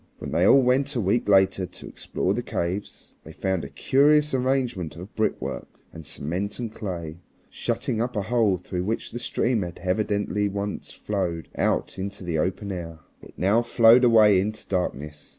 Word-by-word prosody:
When -, -, -7 dB
they 85 Hz, +3 st, +2 dB
all 135 Hz, -1 st, +7 dB
went 135 Hz, +3 st, +2 dB
a -, -, +1 dB
week 105 Hz, +2 st, +1 dB
later 95 Hz, -1 st, +4 dB
to -, -, -10 dB
explore -, -, -2 dB
the -, -, -2 dB
caves, 90 Hz, +4 st, -4 dB
they -, -, -11 dB
found 95 Hz, -2 st, -2 dB
a -, -, -6 dB
curious 150 Hz, +2 st, +3 dB
arrangement 125 Hz, -, -1 dB
of 90 Hz, +5 st, -10 dB
brickwork 110 Hz, -, -2 dB, 0.3 s
and 80 Hz, -, -9 dB
cement 90 Hz, +8 st, -4 dB
and 115 Hz, -3 st, -5 dB
clay, 85 Hz, -6 st, -6 dB, 0.3 s
shutting 125 Hz, -4 st, -2 dB
up 120 Hz, 0 st, -2 dB
a 105 Hz, -, 0 dB
hole 110 Hz, -3 st, +2 dB
through 90 Hz, +1 st, -4 dB
which 110 Hz, +3 st, -3 dB
the 120 Hz, -, -5 dB
stream 120 Hz, -1 st, 0 dB
had 85 Hz, -2 st, -5 dB
evidently 105 Hz, +1 st, 0 dB
once 100 Hz, +1 st, -4 dB
flowed 90 Hz, -6 st, -3 dB
out -, -, 0 dB
into 100 Hz, +1 st, -5 dB
the 85 Hz, -3 st, -1 dB
open 100 Hz, +4 st, -2 dB
air. 85 Hz, -3 st, -6 dB, 0.2 s
It -, -, -15 dB
now 100 Hz, +5 st, +3 dB
flowed 120 Hz, +1 st, +5 dB
away 110 Hz, -5 st, +6 dB
into 110 Hz, +2 st, -4 dB
darkness. 75 Hz, -5 st, -3 dB
100 Hz, 175 wpm, -25 LUFS, 90-115 Hz, 0.3 s, all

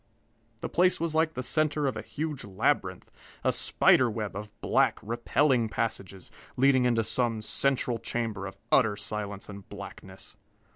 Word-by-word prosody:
The -, -, -2 dB
place 180 Hz, +1 st, +3 dB
was 165 Hz, -1 st, -1 dB
like 160 Hz, 0 st, +1 dB
the 125 Hz, -, -3 dB
center 155 Hz, 0 st, +1 dB
of 135 Hz, -, 0 dB
a -, -, -4 dB
huge 145 Hz, +6 st, -4 dB
labyrinth, 95 Hz, -2 st, -1 dB, 0.3 s
a -, -, +2 dB
spider 130 Hz, -2 st, +4 dB
web 105 Hz, -2 st, -4 dB
of 105 Hz, +1 st, -6 dB
black, 130 Hz, -2 st, +2 dB
repelling 120 Hz, +2 st, +1 dB
passages, 100 Hz, -5 st, -4 dB, 0.3 s
leading 130 Hz, -1 st, +4 dB
into 115 Hz, -2 st, +2 dB
some 115 Hz, -1 st, 0 dB
central 125 Hz, -2 st, +1 dB
chamber 110 Hz, -4 st, -3 dB
of 95 Hz, 0 st, -10 dB
utter 110 Hz, -6 st, +4 dB
silence 105 Hz, -1 st, -4 dB
and 100 Hz, -1 st, -10 dB
blackness. 95 Hz, -1 st, -10 dB
115 Hz, 150 wpm, -28 LUFS, 105-135 Hz, 0.3 s, spider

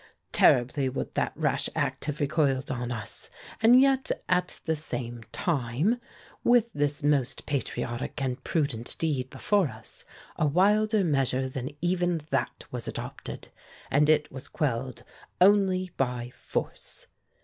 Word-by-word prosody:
Terribly 130 Hz, +2 st, +4 dB
would 130 Hz, -, -4 dB
that -, -, 0 dB
rash -, -, 0 dB
act -, -, -1 dB
have 150 Hz, 0 st, -3 dB
recoiled 145 Hz, -1 st, +1 dB
on 125 Hz, -1 st, -3 dB
us, 110 Hz, -3 st, -6 dB, 0.3 s
and 235 Hz, +3 st, +7 dB
yet, 265 Hz, 0 st, +3 dB, 0.2 s
at 180 Hz, -1 st, 0 dB
the 160 Hz, -, +1 dB
same 120 Hz, -6 st, -5 dB
time, 155 Hz, -, 0 dB, 0.4 s
with 235 Hz, -1 st, +4 dB
this 145 Hz, +1 st, -1 dB
most 145 Hz, -4 st, +1 dB
patriotic 130 Hz, -2 st, -3 dB
and 130 Hz, -1 st, -2 dB
prudent 140 Hz, -8 st, -2 dB
deed 140 Hz, -6 st, -1 dB
before 200 Hz, +2 st, +1 dB
us, 110 Hz, -3 st, -10 dB, 0.3 s
a 155 Hz, -, +2 dB
wilder 210 Hz, +6 st, +3 dB
measure 135 Hz, -4 st, +1 dB
than 130 Hz, 0 st, -4 dB
even 175 Hz, -1 st, +1 dB
that -, -, -1 dB
was -, -, -3 dB
adopted, -, -, -6 dB, 0.4 s
and 150 Hz, +2 st, +4 dB
it 150 Hz, -1 st, +3 dB
was 130 Hz, -1 st, -8 dB
quelled 130 Hz, -3 st, -2 dB, 0.4 s
only 185 Hz, -1 st, +4 dB
by 125 Hz, -2 st, -1 dB
force. -, -, -5 dB
145 Hz, 135 wpm, -28 LUFS, 130-180 Hz, 0.4 s, and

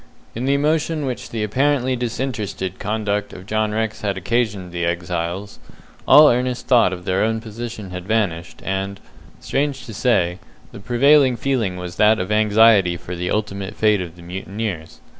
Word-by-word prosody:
In 120 Hz, +3 st, -4 dB
the 140 Hz, +1 st, +2 dB
emotion 155 Hz, +1 st, 0 dB
which 125 Hz, -2 st, -4 dB
the 110 Hz, -2 st, -3 dB
apparently 130 Hz, +3 st, +1 dB
disinterested 115 Hz, -6 st, -3 dB
conduct 105 Hz, -1 st, -2 dB
of 95 Hz, 0 st, -10 dB
John 110 Hz, 0 st, 0 dB
Rex 110 Hz, 0 st, -2 dB
had 100 Hz, -2 st, -2 dB
occasioned 100 Hz, -2 st, -1 dB
the 85 Hz, 0 st, -3 dB
exiles, 85 Hz, +3 st, -3 dB, 0.5 s
all 150 Hz, +2 st, +9 dB
earnest 125 Hz, 0 st, 0 dB
thought 120 Hz, -8 st, +4 dB
of 90 Hz, -1 st, -7 dB
their 95 Hz, +1 st, +1 dB
own 110 Hz, +1 st, 0 dB
position 110 Hz, -3 st, -7 dB
had 90 Hz, 0 st, -7 dB
vanished, 95 Hz, -7 st, -1 dB
and, 95 Hz, +1 st, -3 dB, 0.4 s
strange 140 Hz, -1 st, -2 dB
to 115 Hz, -, -8 dB
say, 90 Hz, -6 st, +1 dB, 0.3 s
the -, -, -10 dB
prevailing 130 Hz, +4 st, +4 dB
feeling 115 Hz, -8 st, -1 dB
was 90 Hz, -1 st, -7 dB
that 110 Hz, +1 st, +5 dB
of 90 Hz, +2 st, -3 dB
anxiety 105 Hz, -4 st, +4 dB
for 90 Hz, +1 st, -7 dB
the 90 Hz, +1 st, -3 dB
ultimate 100 Hz, -2 st, -3 dB
fate 105 Hz, -2 st, +2 dB
of 85 Hz, -2 st, -7 dB
the 85 Hz, -, -14 dB
mutineers. 95 Hz, -1 st, -5 dB
105 Hz, 165 wpm, -21 LUFS, 95-120 Hz, 0.5 s, all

